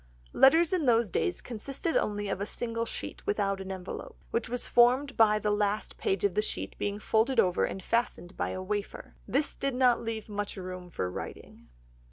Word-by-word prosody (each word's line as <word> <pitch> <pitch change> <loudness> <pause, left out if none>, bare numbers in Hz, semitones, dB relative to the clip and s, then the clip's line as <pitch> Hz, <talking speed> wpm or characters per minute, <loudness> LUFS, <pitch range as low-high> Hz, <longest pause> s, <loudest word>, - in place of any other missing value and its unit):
Letters 325 +6 +6
in 330 -7 +1
those 230 -4 +3
days 355 - 0
consisted 270 +7 -4
only 205 -1 0
of 195 0 -2
a 200 - -2
single 230 0 -2
sheet - - -6
without 195 - 0
an 190 0 -6
envelope, 190 -1 -7
which 230 -1 -1
was 245 0 -2
formed 255 +3 +4
by 215 -1 +5
the 210 0 0
last 205 0 0
page 190 -1 0
of 200 -3 +2
the 210 - +2
sheet 95 - -2
itself - - -23
being 205 0 -1
folded 225 +4 +2
over 180 -4 +3
and 190 - -5
fastened 230 -6 -1
by - - -1
a 185 - -4
wafer. 205 +1 -4
This 290 +2 0
did 275 -2 -2
not 250 -2 +4
leave 225 -2 -4
much 205 -1 -4
room 185 -1 -7
for 90 - -3
writing. - - -8
215 Hz, 200 wpm, -29 LUFS, 195-245 Hz, -, Letters